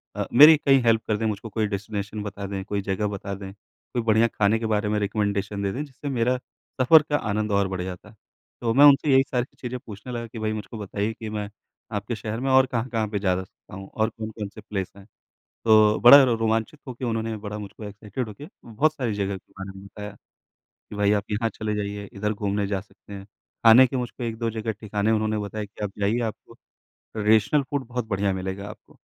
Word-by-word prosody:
अ, -, -, -2 dB
मेरी 150 Hz, +5 st, +9 dB
कहीं 135 Hz, -2 st, +4 dB
हेल्प 115 Hz, -1 st, +3 dB
कर 105 Hz, -, +1 dB
दें, 110 Hz, -, -2 dB
मुझको 110 Hz, +1 st, -3 dB
कोई 110 Hz, 0 st, -1 dB
डेस्टिनेशन 105 Hz, 0 st, -4 dB
बता 100 Hz, -1 st, -6 dB
दें, 95 Hz, -1 st, -4 dB
कोई 100 Hz, -1 st, -2 dB
जगह 100 Hz, +2 st, -1 dB
बता 100 Hz, -1 st, -5 dB
दें, 95 Hz, 0 st, -8 dB, 0.4 s
कोई 120 Hz, -, 0 dB
बढ़िया 110 Hz, +1 st, +4 dB
खाने 110 Hz, 0 st, +1 dB
के 115 Hz, -, -4 dB
बारे 105 Hz, -1 st, 0 dB
में 105 Hz, -, +1 dB
रिकमेंडेशन 100 Hz, 0 st, -1 dB
दे 100 Hz, -, 0 dB
दें 135 Hz, +7 st, -3 dB
जिससे 145 Hz, 0 st, -8 dB
मेरा 125 Hz, -1 st, +1 dB, 0.4 s
सफ़र 155 Hz, +5 st, +7 dB
का 145 Hz, -, +2 dB
आनंद 105 Hz, +1 st, -1 dB
और 100 Hz, -1 st, +2 dB
बढ़ 95 Hz, -1 st, -4 dB
जाता। 95 Hz, +3 st, -8 dB, 0.5 s
तो 115 Hz, -1 st, +1 dB
मैं 140 Hz, +4 st, +7 dB
उनसे 145 Hz, 0 st, +6 dB
यही 135 Hz, 0 st, +6 dB
सारी 125 Hz, -1 st, 0 dB
चीज़ें 125 Hz, 0 st, -4 dB
पूछने 110 Hz, +3 st, -9 dB
लगा 115 Hz, -1 st, -4 dB
कि 115 Hz, -, -9 dB
भई 110 Hz, 0 st, -1 dB
मुझको 110 Hz, +2 st, -6 dB
बताइए 105 Hz, +1 st, -3 dB
कि 110 Hz, 0 st, -7 dB
मैं 105 Hz, -1 st, -4 dB, 0.5 s
आपके 105 Hz, +3 st, -3 dB
शहर 110 Hz, +1 st, -5 dB
में 135 Hz, +2 st, -1 dB
और 130 Hz, 0 st, +6 dB
कहाँ-कहाँ 115 Hz, -3 st, -2 dB
पे 105 Hz, -1 st, -3 dB
जा 95 Hz, -2 st, +1 dB
सकता 90 Hz, -, -16 dB
हूँ 95 Hz, 0 st, -9 dB
और 110 Hz, 0 st, +1 dB
कौन-कौन 110 Hz, -2 st, -6 dB
से -, -, -12 dB
प्लेस 95 Hz, -3 st, -4 dB
हैं। 100 Hz, -, -14 dB, 0.6 s
तो 110 Hz, -1 st, +5 dB
बड़ा 140 Hz, +4 st, +10 dB
रोमांचित 115 Hz, +2 st, 0 dB
होके 125 Hz, 0 st, -5 dB
उन्होंने 115 Hz, -1 st, -2 dB
बड़ा 105 Hz, 0 st, -4 dB
मुझको 105 Hz, +1 st, -9 dB
एक्साइटेड 105 Hz, +3 st, -5 dB
होके 105 Hz, +8 st, -10 dB, 0.2 s
बहुत 130 Hz, +7 st, +1 dB
सारी 125 Hz, -8 st, -2 dB
जगहों 100 Hz, -1 st, -2 dB
के -, -, -22 dB
बारे 95 Hz, 0 st, -6 dB
में 95 Hz, -, -12 dB
बताया। 105 Hz, +1 st, -8 dB, 0.8 s
कि -, -, -8 dB
भई 105 Hz, 0 st, +2 dB
आप 100 Hz, -, 0 dB
यहाँ 115 Hz, +2 st, 0 dB
चले 110 Hz, -1 st, -4 dB
जाइए, 100 Hz, 0 st, -4 dB
इधर 105 Hz, +1 st, -2 dB
घूमने 100 Hz, -1 st, -1 dB
जा 100 Hz, -1 st, -2 dB
सकते 100 Hz, +1 st, -16 dB
हैं। 95 Hz, 0 st, -8 dB, 0.4 s
खाने 120 Hz, +3 st, +9 dB
के 130 Hz, -, -3 dB
मुझको 125 Hz, 0 st, -5 dB
1-2 115 Hz, 0 st, -2 dB
जगह 110 Hz, 0 st, -3 dB
ठिकाने 105 Hz, 0 st, 0 dB
उन्होंने 110 Hz, 0 st, +1 dB
बताया 105 Hz, +1 st, -4 dB
कि 105 Hz, +1 st, -10 dB
आप 100 Hz, -, -2 dB
जाइए 105 Hz, +4 st, +1 dB
आपको -, -, -20 dB, 0.4 s
ट्रेडिशनल 110 Hz, +6 st, +1 dB
फूड 140 Hz, -2 st, -2 dB
बहुत 125 Hz, -1 st, -3 dB
बढ़िया 100 Hz, -2 st, 0 dB
मिलेगा 95 Hz, +2 st, -5 dB
आपको, -, -, -14 dB
110 Hz, 215 wpm, -24 LUFS, 100-115 Hz, 0.8 s, बड़ा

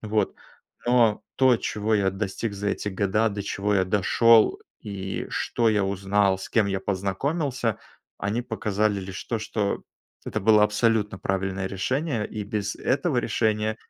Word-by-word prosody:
Вот, 110 Hz, 0 st, 0 dB, 0.5 s
но 120 Hz, -3 st, +3 dB
то, 130 Hz, -3 st, +5 dB
чего 110 Hz, 0 st, -2 dB
я 100 Hz, -2 st, +2 dB
достиг 100 Hz, +3 st, -3 dB
за 100 Hz, +1 st, -3 dB
эти 105 Hz, -, -2 dB
года, 100 Hz, +3 st, +1 dB
до 100 Hz, -1 st, -4 dB
чего 100 Hz, +1 st, -1 dB
я 95 Hz, -2 st, +3 dB
дошёл, 110 Hz, +4 st, +4 dB, 0.2 s
и 95 Hz, -2 st, -5 dB
что 115 Hz, -2 st, 0 dB
я 105 Hz, -2 st, +2 dB
узнал, 95 Hz, 0 st, +1 dB
с 95 Hz, -, -7 dB
кем 110 Hz, -3 st, +2 dB
я 95 Hz, -1 st, -1 dB
познакомился,- 115 Hz, -, -1 dB, 0.4 s
они 105 Hz, +5 st, -1 dB
показали 105 Hz, -3 st, -1 dB
лишь 95 Hz, 0 st, -7 dB
то, 115 Hz, -, -2 dB
что 105 Hz, -2 st, -2 dB, 0.4 s
это -, -, -2 dB
было 105 Hz, +1 st, +5 dB
абсолютно 105 Hz, -2 st, +1 dB
правильное 95 Hz, 0 st, -2 dB
решение. 120 Hz, -, -1 dB
И 105 Hz, -1 st, -5 dB
без 105 Hz, 0 st, -3 dB
этого 140 Hz, +2 st, 0 dB
решения 110 Hz, -2 st, 0 dB
105 Hz, 150 wpm, -25 LUFS, 100-115 Hz, 0.5 s, то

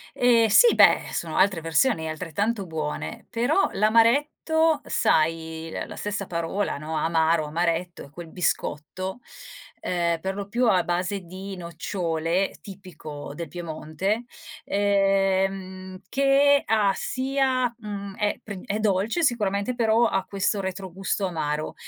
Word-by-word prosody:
Ehm, 235 Hz, -2 st, +4 dB
sì 460 Hz, -, +6 dB
beh, -, -, +5 dB
sono 165 Hz, -2 st, -3 dB
altre 190 Hz, -4 st, +3 dB
versioni 165 Hz, +3 st, +1 dB
e -, -, -3 dB
altrettanto 190 Hz, +7 st, -2 dB
buone 155 Hz, -3 st, -5 dB
però 250 Hz, +10 st, +2 dB
l'amaretto 285 Hz, +9 st, +3 dB
sai, 160 Hz, 0 st, 0 dB
l -, -, -4 dB
la -, -, -9 dB
stessa 205 Hz, -1 st, -3 dB
parola, 170 Hz, +1 st, -2 dB
no, 155 Hz, +2 st, -5 dB
amaro, 160 Hz, 0 st, +2 dB
amaretto, 170 Hz, +2 st, -2 dB
è -, -, -16 dB
quel 165 Hz, +3 st, -10 dB
biscotto, 180 Hz, +4 st, -3 dB, 0.6 s
ehm, 170 Hz, -2 st, 0 dB
per 190 Hz, +2 st, -3 dB
lo 200 Hz, -1 st, -5 dB
più 240 Hz, +4 st, +1 dB
a 180 Hz, -2 st, +3 dB
base 180 Hz, +3 st, -1 dB
di 190 Hz, +2 st, -8 dB
nocciole, 170 Hz, +1 st, -2 dB
tipico 160 Hz, -7 st, -9 dB
del 170 Hz, 0 st, -6 dB
Piemonte, 175 Hz, +5 st, -3 dB, 0.4 s
ehm, 195 Hz, -2 st, 0 dB
che 275 Hz, +1 st, +4 dB
ha 210 Hz, -3 st, +3 dB
sia 260 Hz, -1 st, 0 dB
mhmm, 200 Hz, -3 st, -7 dB
è 210 Hz, -1 st, -1 dB
prin 200 Hz, -4 st, -7 dB
è 205 Hz, +2 st, -2 dB
dolce 215 Hz, -, +1 dB
sicuramente, 215 Hz, -3 st, 0 dB
però 230 Hz, 0 st, +3 dB
ha 195 Hz, -, 0 dB
questo 200 Hz, +1 st, -1 dB
retrogusto 190 Hz, +1 st, -3 dB
amaro. 155 Hz, -3 st, -3 dB
195 Hz, 130 wpm, -25 LUFS, 170-220 Hz, 0.6 s, sì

